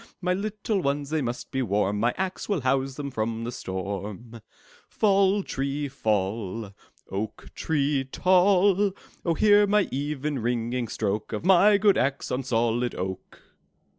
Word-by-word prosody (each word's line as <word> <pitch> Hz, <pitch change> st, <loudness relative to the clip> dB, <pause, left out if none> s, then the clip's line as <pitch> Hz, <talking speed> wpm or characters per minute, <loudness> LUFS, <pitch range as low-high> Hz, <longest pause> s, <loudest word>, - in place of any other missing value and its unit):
My 180 Hz, 0 st, 0 dB
little 205 Hz, +1 st, -2 dB
ones, 140 Hz, -1 st, -1 dB
they 155 Hz, -1 st, +1 dB
must 120 Hz, -1 st, -4 dB
be 135 Hz, -2 st, -1 dB
warm; 105 Hz, -2 st, 0 dB
My 120 Hz, +3 st, +1 dB
axe 190 Hz, +1 st, -3 dB
will 195 Hz, -7 st, 0 dB
house 135 Hz, +1 st, 0 dB
them 140 Hz, -1 st, -5 dB
from 115 Hz, -1 st, -2 dB
the 120 Hz, -, -3 dB
storm! 100 Hz, +4 st, -6 dB, 0.6 s
'Tall, 200 Hz, -1 st, +3 dB
tree, 140 Hz, 0 st, -3 dB
fall! 105 Hz, -3 st, -2 dB, 0.4 s
Oak 105 Hz, +2 st, -5 dB
tree 145 Hz, -3 st, 0 dB
tall! 190 Hz, +1 st, +4 dB, 0.3 s
Oh, 170 Hz, -2 st, +1 dB
hear 205 Hz, +2 st, +5 dB
the 210 Hz, 0 st, +3 dB
even, 145 Hz, 0 st, -2 dB
ringing 120 Hz, +1 st, -1 dB
stroke 105 Hz, 0 st, -2 dB
Of 110 Hz, -, -4 dB
my 195 Hz, +2 st, +6 dB
good 200 Hz, -1 st, +4 dB
axe 135 Hz, +1 st, -1 dB
on 125 Hz, -, 0 dB
solid 120 Hz, -1 st, 0 dB
oak! 95 Hz, 0 st, -6 dB
135 Hz, 145 wpm, -26 LUFS, 115-185 Hz, 0.6 s, my